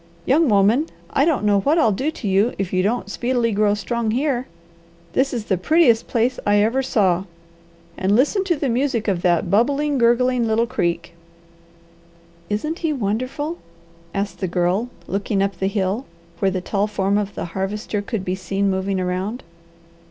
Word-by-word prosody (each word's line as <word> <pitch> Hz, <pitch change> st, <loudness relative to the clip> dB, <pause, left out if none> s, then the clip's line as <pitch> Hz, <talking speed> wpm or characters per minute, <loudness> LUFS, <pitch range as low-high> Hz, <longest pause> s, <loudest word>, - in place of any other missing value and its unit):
"Young 300 Hz, +2 st, +3 dB
woman, 215 Hz, +9 st, +3 dB, 0.2 s
I 280 Hz, -, +3 dB
don't 315 Hz, -9 st, +1 dB
know 205 Hz, -1 st, +3 dB
what 290 Hz, -, +2 dB
I'll 230 Hz, -9 st, +4 dB
do 260 Hz, +10 st, -1 dB
to 280 Hz, -8 st, -6 dB
you 200 Hz, +5 st, +2 dB
if 195 Hz, -2 st, -3 dB
you 185 Hz, -, +2 dB
don't 215 Hz, +3 st, 0 dB
speedily 240 Hz, -1 st, 0 dB
grow 205 Hz, 0 st, +2 dB
strong 230 Hz, +2 st, -2 dB
here. 255 Hz, +1 st, 0 dB, 0.7 s
This 270 Hz, +1 st, +2 dB
is 235 Hz, -4 st, -3 dB
the 190 Hz, -4 st, 0 dB
prettiest 245 Hz, -, +3 dB
place 245 Hz, +2 st, 0 dB
I 205 Hz, -, +2 dB
ever 220 Hz, +6 st, +2 dB
saw, 195 Hz, -8 st, +1 dB, 0.7 s
and 190 Hz, +2 st, +2 dB
listen 295 Hz, -, +2 dB
to 350 Hz, -3 st, +1 dB
the 285 Hz, -1 st, -2 dB
music 245 Hz, -2 st, 0 dB
of 185 Hz, -4 st, 0 dB
that 175 Hz, 0 st, +1 dB
bubbling, 280 Hz, +6 st, +2 dB
gurgling 240 Hz, 0 st, +3 dB
little 225 Hz, +1 st, +2 dB
creek!" 170 Hz, -9 st, -2 dB, 1.4 s
"Isn't 305 Hz, -, -2 dB
he 325 Hz, -2 st, 0 dB
wonderful?" 255 Hz, -, -2 dB, 0.5 s
asked 200 Hz, +2 st, -3 dB
the 190 Hz, -, -1 dB
Girl, 180 Hz, +6 st, 0 dB, 0.2 s
looking 195 Hz, 0 st, -1 dB
up 195 Hz, -3 st, -3 dB
the 190 Hz, -, +1 dB
hill, 200 Hz, +4 st, -1 dB, 0.3 s
where 195 Hz, -, +2 dB
the 185 Hz, -1 st, -2 dB
tall 200 Hz, +2 st, 0 dB
form 200 Hz, -1 st, 0 dB
of 205 Hz, -1 st, -4 dB
the -, -, -3 dB
Harvester 205 Hz, +2 st, -2 dB
could 205 Hz, -2 st, -4 dB
be 185 Hz, -, -1 dB
seen 195 Hz, +2 st, -1 dB
moving 190 Hz, 0 st, -1 dB
around. 185 Hz, +6 st, -3 dB
215 Hz, 175 wpm, -21 LUFS, 195-255 Hz, 1.4 s, I'll